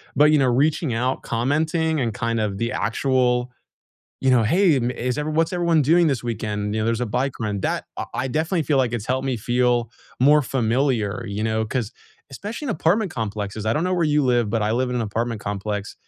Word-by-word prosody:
but, 145 Hz, +2 st, +5 dB
you 155 Hz, -, +5 dB
know, 135 Hz, -, +3 dB
reaching 140 Hz, +3 st, +1 dB
out, 125 Hz, +3 st, -1 dB
commenting, 155 Hz, +6 st, 0 dB
and 115 Hz, -4 st, -1 dB
kind 115 Hz, 0 st, -1 dB
of 100 Hz, -2 st, -2 dB
the 115 Hz, +1 st, -1 dB
actual, 125 Hz, +1 st, 0 dB, 0.7 s
you 135 Hz, -, +3 dB
know, 125 Hz, -2 st, +4 dB
"Hey, 170 Hz, -, +3 dB
ma 125 Hz, 0 st, -1 dB
is 125 Hz, +3 st, -2 dB
everyone 155 Hz, +1 st, -2 dB
what's 165 Hz, +2 st, +2 dB
everyone 170 Hz, -3 st, +2 dB
doing 165 Hz, +5 st, +4 dB
this 135 Hz, -6 st, -1 dB
weekend," 105 Hz, -2 st, -3 dB
you 110 Hz, -, 0 dB
know, 110 Hz, -, 0 dB
"there's 115 Hz, +1 st, 0 dB
a -, -, -1 dB
bike 130 Hz, +5 st, -1 dB
run." 105 Hz, -3 st, -2 dB
That -, -, -1 dB
I -, -, -2 dB
I 135 Hz, -, -1 dB
definitely 160 Hz, +5 st, 0 dB
feel, 145 Hz, -2 st, +1 dB
like, 125 Hz, -3 st, +1 dB
it's 105 Hz, -, -3 dB
helped 130 Hz, +1 st, -1 dB
me 130 Hz, -, 0 dB
feel 120 Hz, 0 st, +1 dB, 0.3 s
more 150 Hz, +3 st, +6 dB
familiar, 120 Hz, -3 st, 0 dB
you 100 Hz, +1 st, -4 dB
know, 110 Hz, 0 st, 0 dB
'cause 115 Hz, 0 st, -3 dB, 0.4 s
especially 205 Hz, -, -6 dB
in -, -, -1 dB
apartment 195 Hz, +3 st, +1 dB
complexes. 105 Hz, -3 st, -4 dB
I 110 Hz, -, +2 dB
don't 160 Hz, -, 0 dB
know 185 Hz, -, 0 dB
where 175 Hz, -, +1 dB
you 150 Hz, -1 st, +2 dB
live, 120 Hz, -3 st, +2 dB
but 110 Hz, +1 st, 0 dB
I 105 Hz, -, 0 dB
live 125 Hz, +2 st, 0 dB
in 125 Hz, -, -2 dB
an 120 Hz, -, 0 dB
apartment 115 Hz, +1 st, -2 dB
complex, 105 Hz, 0 st, -4 dB
125 Hz, 225 wpm, -22 LUFS, 110-150 Hz, 0.7 s, more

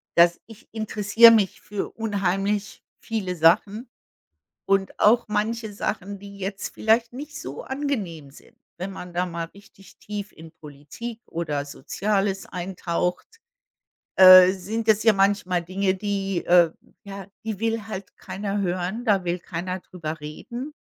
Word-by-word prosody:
Dass 170 Hz, 0 st, +5 dB
ich 225 Hz, -2 st, -15 dB
interessiere 220 Hz, +1 st, +5 dB
mich 210 Hz, -4 st, +2 dB
für 205 Hz, -1 st, -4 dB
unheimlich 200 Hz, -1 st, -2 dB, 0.2 s
viele 200 Hz, -6 st, -3 dB
Sachen 200 Hz, +8 st, +2 dB, 0.8 s
und 195 Hz, -1 st, +1 dB
auch 235 Hz, +3 st, +4 dB
manche 220 Hz, +1 st, -2 dB
Sachen, 200 Hz, -1 st, -4 dB
die 200 Hz, 0 st, -12 dB
jetzt 195 Hz, +1 st, -5 dB
vielleicht 230 Hz, +2 st, +2 dB
nicht 300 Hz, +4 st, -8 dB
so 135 Hz, +3 st, -7 dB
angenehm 210 Hz, -, -4 dB
sind, -, -, -19 dB, 0.2 s
wenn 185 Hz, +2 st, -4 dB
man 180 Hz, -2 st, -9 dB
da 180 Hz, +1 st, 0 dB
mal 170 Hz, -1 st, -4 dB
richtig 200 Hz, -1 st, -18 dB
tief 210 Hz, 0 st, -6 dB
in 160 Hz, 0 st, -13 dB
Politik 155 Hz, +11 st, -9 dB
oder 150 Hz, -4 st, -3 dB
Soziales 195 Hz, +7 st, -2 dB
eintaucht, 180 Hz, -, -3 dB, 0.8 s
äh, 185 Hz, -1 st, +10 dB
sind 215 Hz, +4 st, -4 dB
das 215 Hz, 0 st, +4 dB
ja 220 Hz, -, +7 dB
manchmal 195 Hz, -3 st, +1 dB
Dinge, 190 Hz, +2 st, 0 dB
die 195 Hz, -1 st, -2 dB
äh, 175 Hz, -2 st, +5 dB, 0.3 s
ja, 195 Hz, -1 st, -8 dB, 0.2 s
die 220 Hz, -2 st, -4 dB
will 225 Hz, -1 st, -1 dB
halt 200 Hz, -3 st, -8 dB
keiner 200 Hz, +2 st, -4 dB
hören, 185 Hz, +5 st, -2 dB
da 200 Hz, -4 st, +2 dB
will 175 Hz, +1 st, -1 dB
keiner 180 Hz, +1 st, -5 dB
drüber 160 Hz, -4 st, -7 dB
reden. 240 Hz, -, -7 dB
195 Hz, 140 wpm, -24 LUFS, 180-215 Hz, 0.8 s, äh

